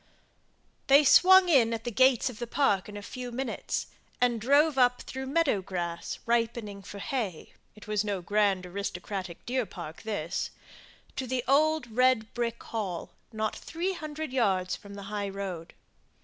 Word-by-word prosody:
They 280 +2 +7
swung 375 +6 +7
in 240 -8 +4
at 225 - -7
the 240 - -3
gates 260 +2 +4
of 250 -4 -5
the 240 - -4
park 220 -8 +1
in 205 - -7
a 205 - -8
few 250 +2 -6
minutes, 250 -1 -3 0.3
and 240 -2 +2
drove 285 +5 +4
up 250 -1 +3
through 265 0 -6
meadow 280 -8 +2
grass, 175 -2 -4
ripening 230 -3 -1
for 200 - -10
hay, 210 - -4 0.2
it 210 - -13
was 210 -1 +1
no 205 -2 -2
grand 200 -1 +1
aristocratic 185 -1 -5
deer 250 -2 -1
park 160 -3 -8
this 195 -6 -3 0.7
to 260 - -2
the 250 0 -1
old 310 +2 +3
red 255 -3 +3
brick 235 -1 -3
hall; 195 -7 -4 0.2
not 215 -1 -2
three 350 +4 -3
hundred 310 -4 -6
yards 190 -7 +1
from 200 -1 -12
the 200 - -8
high 205 -1 -2
road. 190 -4 -6
230 Hz, 165 wpm, -29 LUFS, 200-265 Hz, 0.7 s, They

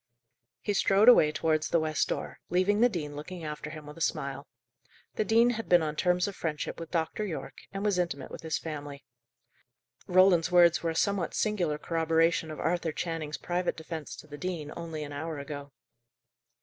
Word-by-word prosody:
He 205 - -1
strode 200 +2 +4
away 160 -11 +8
towards 155 0 0
the 170 - +3
west 155 -1 0
door, - - -4
leaving 190 +4 +2
the 245 - +6
dean 150 -8 -4
looking 170 +4 -7
after 150 0 -5
him 155 -1 -9
with 150 +1 -10
a - - -10
smile. - - -2 0.7
The - - 0
dean 230 +3 +4
had 225 -1 -5
been 175 -2 +6
on 155 -1 -2
terms 180 +3 +2
of 200 - -5
friendship 155 -1 -3
with 165 -1 -7
Dr. 165 +4 -1
Yorke, 190 -6 -5
and 195 +1 -4
was 200 -3 +2
intimate 155 -7 -2
with - - -8
his 160 -1 -1
family. 145 -3 -7 1.0
Roland's 180 -2 +5
words 175 -2 +6
were 165 - 0
a 160 - -3
somewhat 195 -1 0
singular 180 -8 0
corroboration 165 +1 +1
of 155 - -7
Arthur 165 0 0
Channing's 155 -2 -3
private 175 0 -2
defence 160 -7 -6
to 120 - -12
the 145 -1 -10
dean 160 -4 -4
only 165 -2 -5
an 145 -1 -7
hour 155 +2 -4
ago. 145 0 -7
165 Hz, 190 wpm, -29 LUFS, 155-180 Hz, 1.0 s, away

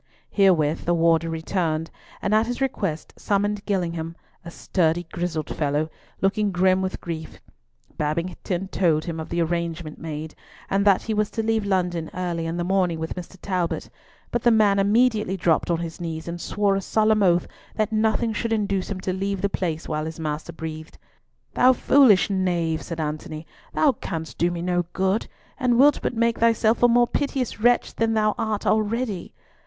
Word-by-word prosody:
Herewith 170 -6 +3
the 175 - +2
warder 165 0 +3
returned, 165 -1 -2 0.3
and 200 - +1
at 220 +1 +3
his 245 0 -3
request 170 - -2
summoned 205 0 0
Gillingham, 170 -4 -2 0.3
a 170 - -8
sturdy 170 -1 0
grizzled 170 -3 -3
fellow, 150 +1 0 0.3
looking 200 +1 +1
grim 185 +1 +3
with 190 0 -3
grief. 160 -2 -6 0.6
Babington 175 +4 -2
told 160 -6 +1
him 165 -2 -4
of 160 - -6
the 170 0 +1
arrangement 170 -1 -3
made, 155 -1 -6 0.4
and 200 +1 +2
that 200 -2 +4
he 220 - -2
was 210 0 +1
to 225 - -3
leave 220 -2 0
London 175 -4 0
early 175 -2 -2
in 165 +1 -3
the 175 - -1
morning 180 -2 +1
with 160 0 -4
Mr. 180 +1 -9
Talbot, 180 -4 -2 0.4
but 240 - 0
the 240 - +4
man 210 -3 +4
immediately 210 -1 +2
dropped 170 -2 +1
on 170 - +2
his 165 +1 -6
knees 160 -1 -5
and 170 0 -5
swore 200 -1 +1
a 195 - -1
solemn 215 +2 +2
oath 175 -3 +3 0.3
that 215 0 0
nothing 220 +1 +1
should 230 +2 -2
induce 200 -3 -1
him 200 -2 -4
to 185 - -2
leave 195 +1 -2
the 200 - +2
place 165 -5 -3
while 155 -1 -2
his 160 0 -6
master 155 +1 -3
breathed. 160 -1 -7 0.6
"Thou 255 +1 +5
foolish 250 -6 +5
knave," 175 -5 0
said 165 -1 -6
Antony, 155 +1 -4 0.3
"thou 300 - +4
canst 160 -9 -6
do 170 - +3
me 175 -1 -4
no 175 0 +1
good, 190 +3 0 0.3
and 250 -3 +2
wilt 285 +3 +5
but - - -2
make 230 0 +1
thyself 230 0 +3
a 245 - +7
more 240 0 +5
piteous 265 -3 -2
wretch 240 +2 +3
than 225 0 +1
thou 215 -1 +2
art 215 -2 -1
already. 215 -2 0
185 Hz, 180 wpm, -24 LUFS, 165-215 Hz, 0.6 s, a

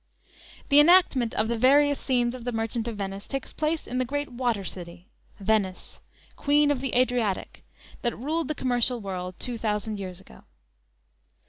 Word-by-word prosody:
The 285 - +7
enactment 295 -7 +5
of 215 - +1
the 235 0 -1
various 285 +3 +4
scenes 245 -2 0
of 255 -2 -8
the 245 - -2
"Merchant 225 0 -2
of 230 -3 -4
Venice" 195 0 -5
takes 275 -1 -5
place 310 +1 -1
in 255 - -3
the - - +2
great 285 +3 -3
water 240 -4 -1
city 175 -1 -8 0.3
Venice, 200 -2 -1 0.4
"Queen 290 0 +3
of 270 -3 -1
the 270 -2 -2
Adriatic," 245 -6 0 0.4
that 240 -2 -1
ruled 310 +6 -1
the 305 - -2
commercial 245 -1 +1
world 185 -3 -5
two 245 -2 -5
thousand 210 -1 -2
years 185 -2 -6
ago. 65 - -17
240 Hz, 165 wpm, -26 LUFS, 210-270 Hz, 0.4 s, The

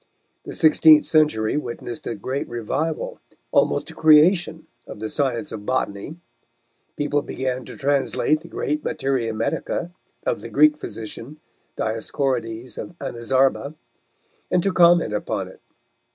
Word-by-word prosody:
The - - -7
sixteenth 155 -1 +6
century 150 -8 +2
witnessed 120 -3 -5
a 115 - -3
great 130 +7 -4
revival, 130 +7 -3 0.3
almost - - +1
a - - -12
creation 160 +2 +4 0.2
of - - -8
the 110 +1 -5
science 135 +2 -1
of 105 - -7
botany. 130 +1 -2 0.8
People 145 0 0
began 130 -2 -3
to - - -10
translate 145 +2 +1
the 170 - -13
great 150 +1 -2
Materia 135 -7 -1
Medica 165 +9 -2 0.3
of - - -1
the - - -7
Greek 305 -1 +5
physician, 115 - -7 0.4
Dioscorides 115 +1 -2
of 170 +2 -8
Anazarba, 135 +4 0 0.7
and 180 -1 +2
to 195 - +1
comment 170 - +5
upon 105 - -2
it. - - -16
140 Hz, 130 wpm, -22 LUFS, 115-155 Hz, 0.8 s, sixteenth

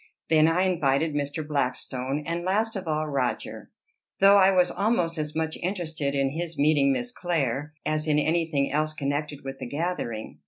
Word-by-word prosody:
Then 155 -1 +5
I 170 +3 +2
invited 160 -4 +1
Mr. 145 +1 -2
Blackstone, 135 0 -2
and 170 +2 -2
last 215 +5 0
of 190 -3 -5
all 155 0 -1
Roger 135 -4 -3 0.5
though 195 +1 +7
I 190 -1 +6
was 180 -2 +3
almost 180 -6 0
as 150 0 -3
much 160 0 -2
interested 160 -6 -3
in 135 -1 +1
his 165 +1 -4
meeting 145 -1 +4
Miss 245 - -1
Clare 150 - -2
as 155 +1 0
in 150 -1 +3
any 165 +2 +1
thing 140 -3 0
else 155 +2 0
connected 145 0 -3
with 135 0 -7
the - - -5
gathering. 140 -7 -4
155 Hz, 175 wpm, -26 LUFS, 140-175 Hz, 0.5 s, though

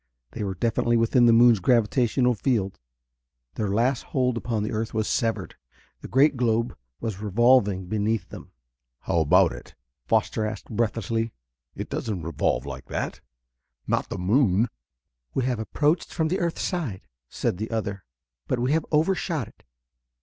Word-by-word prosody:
They 110 - -5
were 95 -2 -3
definitely 115 +3 +1
within 120 +2 +4
the - - +7
moon's 115 -1 +6
gravitational 120 +3 +2
field; 105 -4 -1 0.7
their 105 - -2
last 120 +5 +1
hold 125 -2 0
upon 115 -2 -2
the 105 - -3
earth 110 +1 -3
was 110 -1 0
severed. 110 -7 -1 0.5
The - - -9
great 140 +3 +4
globe 115 -1 0 0.2
was 105 -3 -4
revolving 105 -2 +3
beneath 110 +3 -1
them. - - -11 0.5
"How 85 - 0
about 80 -3 +4
it?" - - -11 0.3
Foster 110 - +1
asked 110 -1 -5
breathlessly. 115 0 -1 0.4
"It - - -6
doesn't 100 -7 -3
revolve 75 -4 -1
like 70 -1 -7
that - - -4 0.6
not - - -1
the - - -4
moon!" 105 +2 +2 0.7
"We - - +1
have 125 -3 -1
approached 150 +8 0
from 160 -2 0
the 185 +3 0
earth 170 -2 -1
side," 150 - -3 0.3
said - - -2
the 110 +3 -4
other, 100 -4 -3 0.4
"but 130 - 0
we 125 +3 0
have 160 0 +1
overshot 160 - +1
it. - - -26
115 Hz, 155 wpm, -25 LUFS, 105-125 Hz, 0.7 s, the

